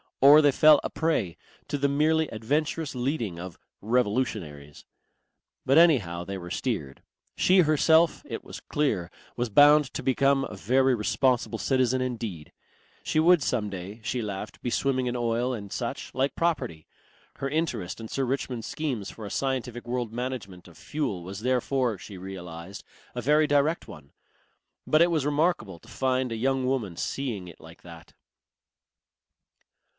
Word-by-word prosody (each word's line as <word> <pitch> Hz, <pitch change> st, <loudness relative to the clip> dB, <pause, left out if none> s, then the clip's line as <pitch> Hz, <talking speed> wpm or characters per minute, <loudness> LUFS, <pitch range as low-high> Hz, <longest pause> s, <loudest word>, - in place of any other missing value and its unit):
Or 145 Hz, +3 st, +8 dB
they 145 Hz, -1 st, +5 dB
fell 150 Hz, +2 st, +6 dB
a -, -, -2 dB
prey 150 Hz, -, -1 dB, 0.3 s
to 145 Hz, -, -2 dB
the 140 Hz, 0 st, +1 dB
merely 155 Hz, +3 st, +2 dB
adventurous 145 Hz, +7 st, -2 dB
leading 120 Hz, -, -2 dB
of 90 Hz, -1 st, -8 dB, 0.2 s
"revolutionaries." 105 Hz, -, -2 dB, 0.8 s
But 135 Hz, +3 st, +4 dB
anyhow 105 Hz, -, +3 dB
they 95 Hz, +2 st, -5 dB
were 90 Hz, -1 st, -9 dB
steered. 95 Hz, -, -3 dB, 0.3 s
She 185 Hz, +1 st, +4 dB
herself, 160 Hz, +1 st, +3 dB
it -, -, -6 dB
was -, -, -9 dB
clear, 110 Hz, -13 st, -1 dB, 0.3 s
was 120 Hz, -1 st, -2 dB
bound 145 Hz, +6 st, +6 dB
to -, -, -4 dB
become 135 Hz, +1 st, +2 dB
a 135 Hz, -, -6 dB
very 130 Hz, +6 st, +2 dB
responsible 120 Hz, +1 st, +1 dB
citizen 130 Hz, -1 st, +1 dB
indeed. 115 Hz, -11 st, -4 dB, 0.5 s
She 155 Hz, -, 0 dB
would 170 Hz, 0 st, +5 dB
some 110 Hz, -5 st, -1 dB
day, 95 Hz, +3 st, -7 dB
she 125 Hz, +1 st, -2 dB
laughed, 105 Hz, 0 st, -6 dB
be 120 Hz, -, -2 dB
swimming 130 Hz, -1 st, 0 dB
in 120 Hz, -, -2 dB
oil 120 Hz, +1 st, 0 dB
and 100 Hz, -4 st, -7 dB
such 135 Hz, +3 st, -4 dB
like 135 Hz, +2 st, 0 dB
property. 145 Hz, -, -2 dB, 0.5 s
Her 135 Hz, -, -3 dB
interest 125 Hz, -, -2 dB
in 115 Hz, -, -7 dB
Sir 135 Hz, -, -2 dB
Richmond's 125 Hz, -3 st, -3 dB
schemes 130 Hz, -10 st, -3 dB
for 110 Hz, -, -9 dB
a 100 Hz, -, -7 dB
scientific 125 Hz, -3 st, -3 dB
world 120 Hz, -2 st, -2 dB
management 115 Hz, -7 st, -5 dB
of 85 Hz, -, -16 dB
fuel 125 Hz, -, -3 dB
was 95 Hz, +3 st, -7 dB
therefore, 125 Hz, -1 st, 0 dB
she 95 Hz, 0 st, -10 dB
realized, 90 Hz, -1 st, -8 dB, 0.3 s
a 125 Hz, -, -4 dB
very 150 Hz, +5 st, +4 dB
direct 145 Hz, +3 st, +1 dB
one. 70 Hz, -1 st, -13 dB, 0.7 s
But 155 Hz, -, +4 dB
it 175 Hz, -, +2 dB
was 155 Hz, -4 st, 0 dB
remarkable 150 Hz, -, 0 dB
to -, -, -20 dB
find 130 Hz, -1 st, -1 dB
a -, -, -2 dB
young 130 Hz, +3 st, 0 dB
woman 125 Hz, -9 st, -1 dB
seeing 110 Hz, -4 st, -3 dB
it 85 Hz, -, -13 dB
like 80 Hz, +1 st, -14 dB
that. 85 Hz, -2 st, -13 dB
125 Hz, 160 wpm, -27 LUFS, 100-140 Hz, 0.8 s, Or